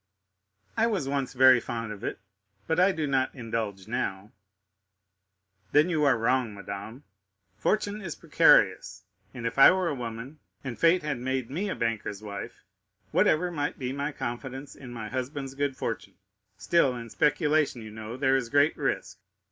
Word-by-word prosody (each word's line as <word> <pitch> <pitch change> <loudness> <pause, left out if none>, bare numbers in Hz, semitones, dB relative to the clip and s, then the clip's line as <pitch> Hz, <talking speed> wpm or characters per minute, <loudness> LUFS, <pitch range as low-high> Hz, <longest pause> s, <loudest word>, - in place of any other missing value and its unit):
"I 230 0 +3
was 190 -11 -1
once 135 -2 -2
very 130 -1 +7
fond 115 -1 -5
of 105 -1 -9
it, - - -3 0.5
but 160 - 0
I 185 +2 +5
do 160 -4 -2
not 135 -1 0
indulge 110 -5 -4
now." 105 -3 -3 1.4
"Then 150 +4 +5
you 155 -4 +1
are 135 -4 +4
wrong, 120 -1 +1
madame. 100 +6 -8 0.6
Fortune 210 - 0
is 170 -7 -5
precarious; - - +3 0.3
and 120 - -7
if 115 - -2
I - - +10
were 185 -2 +1
a - - -1
woman 120 +3 -6 0.2
and 130 -4 -6
fate 170 +1 +4
had 150 -4 -2
made 130 0 -2
me 190 +8 -2
a - - -2
banker's 110 -3 -3
wife, 100 -2 -7 0.5
whatever 175 +3 +3
might 145 -3 -2
be 130 -1 -3
my 140 +2 -2
confidence 135 +1 -6
in 125 -3 -10
my 115 -3 -6
husband's 135 +3 -4
good 140 -1 -2
fortune, 115 - -4 0.4
still 150 -7 +2
in 115 -2 -8
speculation 150 -5 +1
you 110 - -9
know 110 +2 -7
there 135 0 +3
is 125 -3 -1
great 145 +4 +3
risk. - - -2
130 Hz, 165 wpm, -28 LUFS, 115-150 Hz, 1.4 s, I